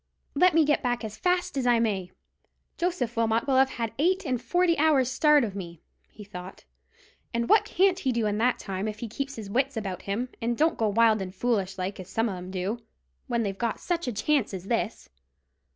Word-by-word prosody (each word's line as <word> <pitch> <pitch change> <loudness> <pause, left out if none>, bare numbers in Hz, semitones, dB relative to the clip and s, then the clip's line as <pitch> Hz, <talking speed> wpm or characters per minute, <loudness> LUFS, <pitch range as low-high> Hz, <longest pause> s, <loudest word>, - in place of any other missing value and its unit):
"Let 345 +3 +4
me 325 -2 +5
get 295 0 +2
back 245 -2 -1
as 215 -1 -5
fast 360 -3 0
as 250 - 0
I 240 -1 +5
may, 200 -6 -1 0.7
Joseph 340 -10 -1
Wilmot 230 +1 +1
will 270 -2 +2
have 265 0 +5
had 230 -4 -4
eight 370 +5 +2
and 255 -4 -1
forty 355 +2 +2
hours' 285 -5 +3
start 300 +1 +4
of 205 -4 -3
me," 170 -4 -7 0.3
he 210 - -12
thought; 185 -2 -10 0.7
"and 235 0 0
what 435 - +5
can't 375 0 +2
he 265 - 0
do 235 -2 0
in 210 0 0
that 245 +2 +2
time, 195 +1 -4
if 215 -1 -4
he 235 - -5
keeps 275 +5 -4
his 220 -3 -7
wits 260 +5 0
about 195 -4 -4
him, 225 +6 -3
and 235 +1 -1
don't 320 +2 +3
go 220 - +2
wild 220 0 +4
and 185 0 -6
foolish 195 -3 -1
like, 190 +3 -4
as 185 0 -9
some 225 +3 0
of 195 - -4
'em 180 0 -8
do, 190 +5 -3 0.5
when 235 -1 0
they've 195 -2 -2
got 235 -2 -1
such 340 -4 -2
a - - 0
chance 230 0 0
as 180 - -7
this. 230 -1 -1
230 Hz, 220 wpm, -27 LUFS, 205-275 Hz, 0.7 s, me